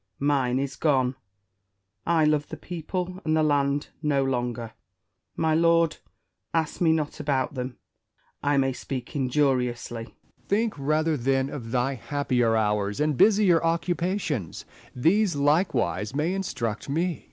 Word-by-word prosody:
Mine 135 -3 +1
is 135 -1 -2
gone: 130 -5 +2 0.9
I 165 -2 +4
love 150 -1 +1
the 160 - -6
people 180 +3 -4
and 155 0 +1
the 155 - +3
land 145 -1 +1
no 145 -3 +2
longer. 120 -3 -2 0.6
My 160 -1 +1
lord, 165 0 +3 0.6
ask 160 +1 -1
me 165 -2 +5
not 155 -1 -1
about 140 -3 0
them: 125 -2 -5 0.6
I 145 0 +2
may 135 -1 +2
speak 130 0 -6
injuriously. 125 -4 0
Essex. - - -21 0.3
Think 220 +2 +1
rather, 155 +3 +1
then, 135 +2 0
of 120 -6 -6
thy 125 +3 0
happier 125 -4 0
hours 105 -2 0
and 150 -1 +1
busier 195 - +4
occupations; 170 - -1 0.3
these 180 - +2
likewise 140 - +1
may 155 +5 0
instruct 120 - -3
me. 160 +5 +1
Spenser. 175 -4 -3
145 Hz, 140 wpm, -26 LUFS, 125-165 Hz, 0.9 s, me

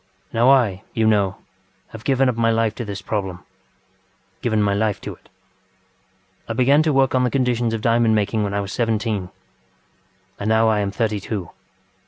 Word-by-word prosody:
Now 120 +3 +4
I, 115 -9 +3
you 115 - +2
know, 100 -3 +2 0.5
have 110 -1 -11
given 135 +1 +2
up 125 - 0
my 115 0 +2
life 115 -1 +1
to 120 - -5
this 100 -2 -6
problemŌĆögiven 100 +3 -7
my 100 -1 +2
life 105 0 0
to - - -6
it. - - -21 1.2
ŌĆ£I 115 - -2
began 140 +4 +4
to 155 0 +1
work 135 -2 +2
at 130 -1 +2
the 125 - +2
conditions 120 -3 0
of 110 - -5
diamond 115 0 +3
making 105 +1 0
when 100 -1 -2
I 100 - 0
was 100 0 -6
seventeen, 110 -5 -1 1.1
and 100 - -2
now 110 0 +4
I 110 -1 +2
am 100 -1 -1
thirty 105 0 -1
two. 100 -3 -5
110 Hz, 180 wpm, -21 LUFS, 100-120 Hz, 1.2 s, Now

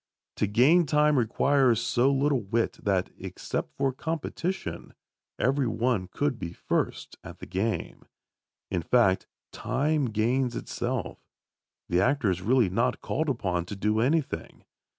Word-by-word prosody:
To 105 - +1
gain 145 - +4
time 150 +1 +3
requires 125 +1 +3
so 120 +3 +2
little 140 -1 +2
wit 110 +3 -1
that, 95 -3 0
except - - -5
for 135 -1 +1
competition, 165 +5 -4 0.4
every 135 +1 +1
one 115 -4 0
could 140 +5 -2
be 85 -4 -5
first - - -2
at - - -10
the - - -9
game. 105 +4 -3 0.7
In 90 - 0
fact, 95 0 +2 0.2
time 150 0 0
gains 120 +3 0
itself. - - -3 0.7
The 90 +1 +2
actor 125 -3 +2
is 90 0 -3
really 120 +2 +3
not 115 +7 0
called 155 +2 -1
upon 90 -9 -1
to 100 - -5
do 105 +2 0
anything. 145 +6 -1
125 Hz, 135 wpm, -27 LUFS, 105-140 Hz, 0.7 s, gain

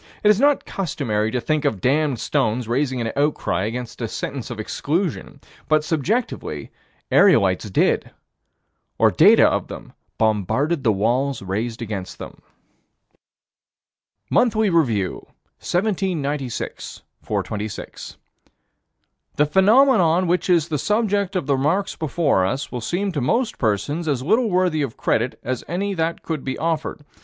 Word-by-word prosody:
It 210 - +5
is 210 0 +4
not 285 +1 +3
customary 125 - -2
to 125 - -1
think 155 +4 -1
of 105 - 0
damned 140 +4 +1
stones 110 +2 0
raising 130 +1 0
an 115 -1 -2
outcry 140 - 0
against 120 +2 -5
a 115 - -1
sentence 130 +3 -5
of 120 -3 -6
exclusion, 150 - -3 0.3
but, 155 -1 +3
subjectively, 175 - -2 0.4
aerolites 105 - +4
did - - +1 0.9
or - - +4
data - - +6
of - - -1
them - - -10 0.2
bombarded 115 - 0
the 115 - +4
walls 120 +5 0
raised 110 +5 -3
against 100 -4 -6
them - - -10 1.9
Monthly 220 -4 +3
Review, 115 - 0 0.3
1796 170 - -2 0.2
426 105 0 -5 1.2
"The 150 - +3
phenomenon 190 - +4
which 180 +2 0
is 170 -3 +3
the 150 -3 -1
subject 205 - 0
of 180 - -1
the 140 - +2
remarks 165 +9 0
before 155 - +1
us 130 +9 -2
will 125 - -4
seem 190 - -1
to 150 -6 -2
most 230 - 0
persons 135 - -1
as 135 -4 0
little 220 - +2
worthy 180 -4 +1
of 135 -6 -3
credit 120 +3 0
as 130 -1 -3
any 195 +5 -2
that 165 -2 -2
could 160 -4 -4
be 130 - -3
offered. 160 -2 -2
145 Hz, 135 wpm, -22 LUFS, 120-180 Hz, 1.9 s, data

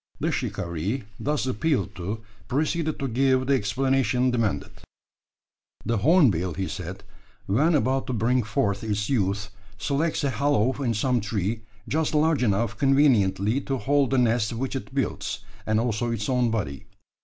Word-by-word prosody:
The - - 0
shikaree, 85 - -2 0.2
thus 150 -1 -1
appealed 125 -4 0
to, 100 +5 -4 0.3
proceeded 155 +3 0
to 135 - -2
give 130 +1 +2
the 140 - +2
explanation 130 +1 +1
demanded. 115 -5 -1 1.1
The 115 -2 0
hornbill, 105 - +3
he 95 -1 -2
said, 95 0 -6 0.4
when 150 - +3
about 135 -1 +1
to 130 - -2
bring 120 +3 +2
forth 100 -1 -1
its 105 +2 -1
young, 100 -6 +2 0.4
selects 145 +8 -1
a 140 - +1
hollow 135 -3 +2
in 120 -4 0
some 125 +2 +1
tree, 105 +1 -2 0.3
just 155 0 0
large 150 -2 +3
enough 110 -1 0
conveniently 125 -5 +3
to 135 -1 -2
hold 140 0 +2
the 135 - +1
nest 120 -2 +2
which 130 +3 -3
it 135 - -5
builds, 135 - -2 0.3
and 110 0 +2
also 120 0 -1
its 110 -3 -2
own 125 -2 +2
body. 75 -12 -3
120 Hz, 155 wpm, -25 LUFS, 105-135 Hz, 1.1 s, hornbill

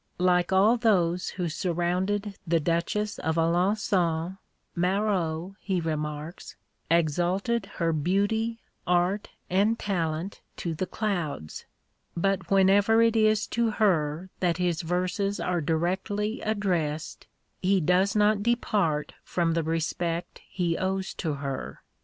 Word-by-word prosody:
Like 180 0 +2
all 205 +6 +5
those 180 -6 +2
who 180 -2 -3
surrounded 185 +4 -1
the 165 0 +3
Duchess 170 +7 -1
of 160 0 -1
Alençon, 175 0 +1 0.4
Marot, 180 -2 0
he 190 -3 -1
remarks, 155 0 -4 0.3
exalted 180 - +1
her 165 -1 +1
beauty, 205 +8 0 0.3
art, 180 +3 +1 0.2
and 205 +5 +2
talent 170 -2 -2 0.2
to 170 - -3
the 180 +4 -3
clouds; 170 - -3 0.5
but 190 -1 0
whenever 200 +3 +5
it 230 0 +3
is 215 -1 +3
to 235 -1 +1
her 180 -5 +1
that 175 -3 +1
his 175 -2 0
verses 185 +4 -1
are 180 -2 0
directly 190 +7 -1
addressed, 175 -8 -2 0.3
he 190 +1 +3
does 185 +5 +2
not 210 0 +3
depart 205 -9 0
from 170 -2 0
the 165 - +1
respect 165 +2 -2
he 170 -3 -1
owes 190 0 -1
to 160 -4 -2
her. 140 -1 -5
180 Hz, 120 wpm, -27 LUFS, 165-205 Hz, 0.5 s, all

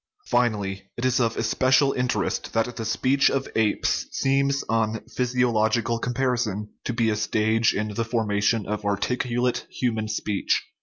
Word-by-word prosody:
Finally, 100 -5 0
it 120 - -2
is 130 0 +2
of 115 -2 +1
especial 130 +4 +3
interest 125 0 -1
that 115 +2 0
the 115 - -4
speech 130 +5 +2
of 135 -1 -1
apes 110 -2 +1
seems 140 +1 +1
on 110 0 0
physiological 115 -2 +1
comparison 120 -5 -1
to - - -2
be 115 -2 +1
a - - 0
stage 110 +1 +1
in 105 +1 -2
the 115 - -1
formation 110 -1 0
of 105 0 -3
articulate 120 +4 -1
human 110 -4 -1
speech. 105 -2 -1
115 Hz, 145 wpm, -24 LUFS, 110-125 Hz, -, especial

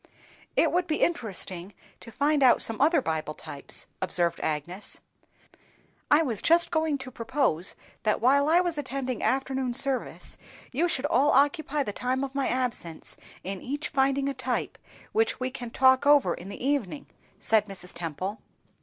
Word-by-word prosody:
"It - - +3
would 360 0 +1
be 310 -2 +1
interesting 195 - -2 0.2
to 230 - -12
find 290 +4 +1
out 255 -2 +6
some 225 +2 0
other 305 -1 +4
Bible 155 -1 -2
types," 140 - -6 0.2
observed 170 -1 +2
Agnes. 165 +6 -3 1.1
"I 300 +2 +5
was 235 -9 -3
just 340 +1 +4
going 315 -2 +1
to 265 -1 -8
propose 230 - 0 0.3
that 215 -1 +1
while 280 +4 +4
I 330 - +5
attend 275 -5 -2
afternoon 265 -2 0
service, 270 -1 -2 0.3
you 315 +7 +1
should 285 -5 0
all 290 -2 +3
occupy 285 +1 +2
the 205 - -4
time 255 +4 -1
of 270 -1 -4
my 275 -1 0
absence 240 -10 -3 0.3
in 190 0 -5
each 290 +4 -4
finding 275 0 +1
a 280 - -1
type, 255 -1 -3 0.3
which 445 +1 +1
we 255 0 -2
can 245 -3 -6
talk 260 +3 +4
over 280 -12 +5
in 185 - -9
the 220 - -6
evening," 280 -2 -1 0.3
said 215 -1 +2
Mrs. 185 -2 -5
Temple. 175 +5 -4
260 Hz, 160 wpm, -27 LUFS, 205-285 Hz, 1.1 s, out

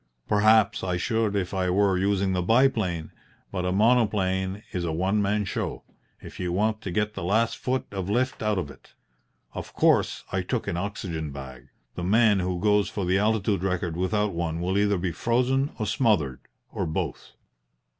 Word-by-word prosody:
Perhaps 110 0 +4
I 90 -2 -1
should 110 +2 0
if 95 -2 -2
I 95 -1 0
were 95 +1 +3
using 95 0 +1
the 90 - 0
biplane, 105 -7 +2 0.4
but 90 -2 -2
a - - 0
monoplane 100 -3 +2
is 90 - -2
a 85 - -1
one 95 +6 +1
man 105 +1 0
show - - -4 0.4
if - - -11
you 90 -1 -2
want 110 +4 0
to - - -5
get 105 +3 -1
the - - -6
last 110 +6 +1
foot 130 +1 -2
of 95 -1 -4
lift 125 +5 0
out 105 -2 +1
of 80 -6 -3
it. - - -19 0.6
Of - - -7
course, - - +2
I - - 0
took - - -3
an - - -1
oxygen 85 -5 -4
bag; 65 -2 -9 0.3
the 90 - -5
man 105 +2 +4
who 90 -1 -2
goes 105 +1 +2
for 100 - -3
the 95 +2 +2
altitude 105 -2 +1
record 90 -3 -1
without 105 +3 0
one 85 -1 -2
will 90 +2 -1
either 100 0 +2
be 90 0 -2
frozen 125 - +1
or 110 - -2
smothered 90 - +1 0.3
or - - -2
both. 80 - -4
95 Hz, 185 wpm, -26 LUFS, 90-105 Hz, 0.6 s, Perhaps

